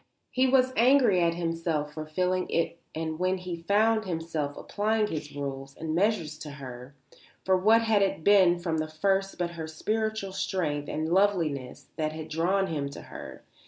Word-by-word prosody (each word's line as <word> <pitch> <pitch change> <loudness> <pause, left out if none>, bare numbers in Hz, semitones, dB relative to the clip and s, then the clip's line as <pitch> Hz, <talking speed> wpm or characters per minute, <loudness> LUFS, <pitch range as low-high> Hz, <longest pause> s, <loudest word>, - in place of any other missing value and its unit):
He 260 +1 +3
was 260 0 +3
angry 240 -6 +5
at 170 -1 +2
himself 165 -3 -2
for 155 0 -6
feeling 180 +3 0
it 170 0 -1 0.2
and 160 0 -3
when 185 +1 +1
he 180 -2 -6
found 215 +4 +3
himself 160 -4 -3
applying 215 +1 0
his 150 -6 -5
rules 135 -1 -5
and 160 -1 -3
measures 170 -5 0
to 155 -1 -7
her; 130 -1 -9 0.5
for 190 - +4
what 220 +5 +4
had 220 -2 +3
it 195 -5 0
been 190 -3 +6
from 165 -2 -2
the 155 - -1
first 195 +5 0
but 175 -1 -1
her 165 -2 -6
spiritual 215 +4 -2
strength 150 -7 -2
and 155 +1 -2
loveliness 170 -10 0
that 155 -1 -1
had 160 0 -7
drawn 180 +5 +1
him 150 -6 -3
to 140 - -9
her? - - -9
170 Hz, 175 wpm, -28 LUFS, 155-200 Hz, 0.5 s, been